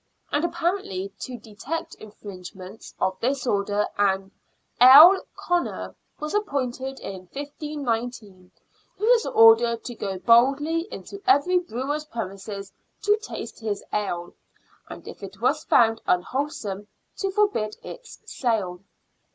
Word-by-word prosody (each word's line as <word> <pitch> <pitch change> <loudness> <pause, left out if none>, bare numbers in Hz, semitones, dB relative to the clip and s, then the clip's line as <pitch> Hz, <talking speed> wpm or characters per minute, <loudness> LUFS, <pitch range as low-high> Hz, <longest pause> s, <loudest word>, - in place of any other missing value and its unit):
And 290 - +1
apparently 340 - -2
to 250 -1 -6
detect 280 +10 -6
infringements 200 -1 -11
of 190 0 -1
this 265 +2 -1
order, 205 -2 +1
an 195 -1 +1 0.3
" - - -36
ale 305 +10 +10
Conner 350 0 -2
" - - -44
was 300 0 -4
appointed 270 - -2
in 185 -2 -8
1519, 245 - -5 0.5
who 420 - -2
was 470 -1 +4
ordered 225 +1 +5
to 245 - -6
go 195 -4 -4
boldly 275 - +3
into 400 - -9
every 360 0 +4
brewer's 295 -1 -4
premises, 200 -5 -6 0.3
to 415 0 +4
taste 430 - -8
his 215 -3 -3
ale, 175 -4 -2 0.6
and - - -10
if - - -10
it 195 -1 -9
was 275 +6 +1
found 225 -1 +4
unwholesome, 205 -1 -2 0.3
to 390 - -1
forbid 385 - 0
its - - -11
sale. 205 -8 -2
240 Hz, 125 wpm, -24 LUFS, 205-305 Hz, 0.6 s, ale